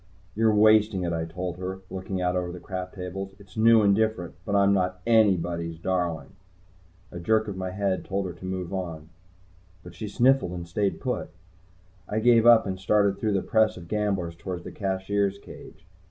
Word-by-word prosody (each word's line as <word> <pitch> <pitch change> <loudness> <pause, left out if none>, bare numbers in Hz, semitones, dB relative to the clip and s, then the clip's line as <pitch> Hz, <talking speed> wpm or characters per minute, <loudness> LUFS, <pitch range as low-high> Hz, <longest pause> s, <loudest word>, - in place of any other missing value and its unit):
"You're 110 +1 +2
wasting 105 -2 +4
it," 85 -1 -1
I 80 0 -2
told 90 +1 -5
her, 95 +1 -5
looking 95 0 -4
out 90 0 0
over 90 -1 -2
the 90 - -8
crap 90 -1 -6
tables. 95 +1 -6
"It's 95 -2 -18
new, 115 0 +5
and 100 -1 +4
different. 110 -5 -1
But 100 - -1
I'm 100 0 +4
not 90 -1 0
anybody's 90 -7 +2
darling." 85 -4 -2 0.8
A 85 - -7
jerk 110 +5 +1
of 100 - -4
my 95 0 -4
head 95 0 -1
told 100 0 -2
her 90 - -5
to 90 +2 -11
move 95 -1 -4
on. 85 -4 -5 0.7
But 90 - -11
she 105 +5 -6
sniffled 120 -2 +2
and 85 -1 -6
stayed 95 0 -1
put. - - -3 0.8
I 105 - -2
gave 115 0 +5
up 120 -1 +7
and 95 -2 -4
started 100 0 +2
through 105 -1 0
the 95 - 0
press 110 -1 +2
of 85 -1 -10
gamblers 100 -4 -1
toward 90 0 -6
the - - -8
Cashier's 100 0 -1
cage. 100 - -13
95 Hz, 190 wpm, -26 LUFS, 90-105 Hz, 0.8 s, up